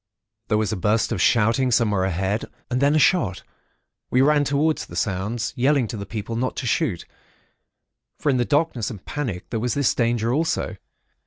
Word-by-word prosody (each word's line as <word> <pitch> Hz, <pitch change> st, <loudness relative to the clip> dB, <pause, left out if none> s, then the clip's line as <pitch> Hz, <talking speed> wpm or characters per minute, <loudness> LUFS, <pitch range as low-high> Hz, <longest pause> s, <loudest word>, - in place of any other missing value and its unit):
There 105 Hz, -, +2 dB
was 110 Hz, 0 st, 0 dB
a -, -, -1 dB
burst 105 Hz, +5 st, +1 dB
of 105 Hz, -6 st, -1 dB
shouting 115 Hz, +6 st, +3 dB
somewhere 105 Hz, -6 st, +2 dB
ahead, 95 Hz, +3 st, -1 dB, 0.3 s
and 125 Hz, +2 st, 0 dB
then 140 Hz, +2 st, +4 dB
a -, -, +5 dB
shot. 135 Hz, -, +2 dB, 0.7 s
We 125 Hz, -, +3 dB
ran 150 Hz, 0 st, +4 dB
towards 145 Hz, +3 st, 0 dB
the -, -, -10 dB
sounds, 105 Hz, +4 st, -2 dB
yelling 135 Hz, +1 st, +2 dB
to -, -, -4 dB
the 100 Hz, -1 st, -6 dB
people 110 Hz, +1 st, -5 dB
not 130 Hz, +2 st, -1 dB
to -, -, -4 dB
shoot; 115 Hz, -, 0 dB, 1.1 s
for 150 Hz, -, +1 dB
in 130 Hz, -, +1 dB
the 120 Hz, -, +2 dB
darkness 145 Hz, -5 st, 0 dB
and 105 Hz, -7 st, -9 dB
panic 125 Hz, -12 st, -4 dB
there 115 Hz, -, -1 dB
was 120 Hz, +1 st, -1 dB
this 140 Hz, -3 st, +2 dB
danger 115 Hz, -1 st, 0 dB
also. 160 Hz, +4 st, -1 dB
120 Hz, 185 wpm, -23 LUFS, 105-140 Hz, 1.1 s, a